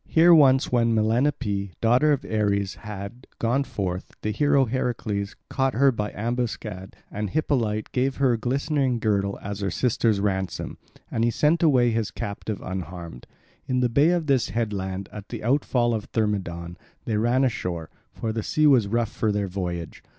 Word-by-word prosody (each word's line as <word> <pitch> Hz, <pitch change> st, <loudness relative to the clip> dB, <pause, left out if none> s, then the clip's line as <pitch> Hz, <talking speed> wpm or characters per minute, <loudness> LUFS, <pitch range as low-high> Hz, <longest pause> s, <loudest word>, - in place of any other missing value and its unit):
Here 170 Hz, +2 st, +6 dB
once 135 Hz, -4 st, +5 dB
when 115 Hz, -2 st, +3 dB
Melanippe, 110 Hz, -4 st, 0 dB
daughter 125 Hz, +7 st, +4 dB
of 145 Hz, -, 0 dB
Ares, 100 Hz, -3 st, 0 dB
had, 105 Hz, +4 st, -8 dB
gone 120 Hz, +4 st, +1 dB
forth, 100 Hz, -8 st, -4 dB
the 105 Hz, -, 0 dB
hero 140 Hz, +4 st, +3 dB
Heracles 110 Hz, -5 st, -2 dB
caught 135 Hz, -2 st, 0 dB
her 135 Hz, +3 st, +5 dB
by 105 Hz, -3 st, -3 dB
ambuscade 110 Hz, -4 st, -3 dB, 0.2 s
and 105 Hz, 0 st, -3 dB
Hippolyte 115 Hz, -7 st, 0 dB
gave 130 Hz, +1 st, 0 dB
him -, -, -8 dB
her 130 Hz, -3 st, +4 dB
glistening 135 Hz, +2 st, 0 dB
girdle 100 Hz, -3 st, 0 dB
as 100 Hz, 0 st, -5 dB
her 100 Hz, -1 st, -1 dB
sister's 110 Hz, +2 st, +1 dB
ransom, 95 Hz, -2 st, -2 dB, 0.3 s
and 115 Hz, -, 0 dB
he 120 Hz, -, +3 dB
sent 150 Hz, +7 st, +2 dB
away 130 Hz, -7 st, +4 dB
his 110 Hz, -2 st, -1 dB
captive 110 Hz, -2 st, -5 dB
unharmed. 85 Hz, -7 st, -6 dB, 0.4 s
In 125 Hz, -1 st, +1 dB
the 125 Hz, -, +2 dB
bay 140 Hz, +7 st, +4 dB
of 175 Hz, -2 st, +1 dB
this 135 Hz, -4 st, +2 dB
headland, 100 Hz, -4 st, -3 dB
at 105 Hz, -1 st, -9 dB
the -, -, -6 dB
outfall 120 Hz, -1 st, +2 dB
of 110 Hz, -2 st, -2 dB
Thermodon, 90 Hz, -6 st, -2 dB, 0.3 s
they 110 Hz, -, 0 dB
ran 120 Hz, +4 st, +2 dB
ashore, 90 Hz, -10 st, -2 dB, 0.2 s
for 110 Hz, -1 st, -4 dB
the 110 Hz, -, -2 dB
sea 155 Hz, +7 st, +1 dB
was 130 Hz, -8 st, +5 dB
rough 115 Hz, +1 st, 0 dB
for 110 Hz, -, 0 dB
their 100 Hz, -1 st, -1 dB
voyage. 90 Hz, -3 st, -4 dB
115 Hz, 170 wpm, -25 LUFS, 100-130 Hz, 0.4 s, Here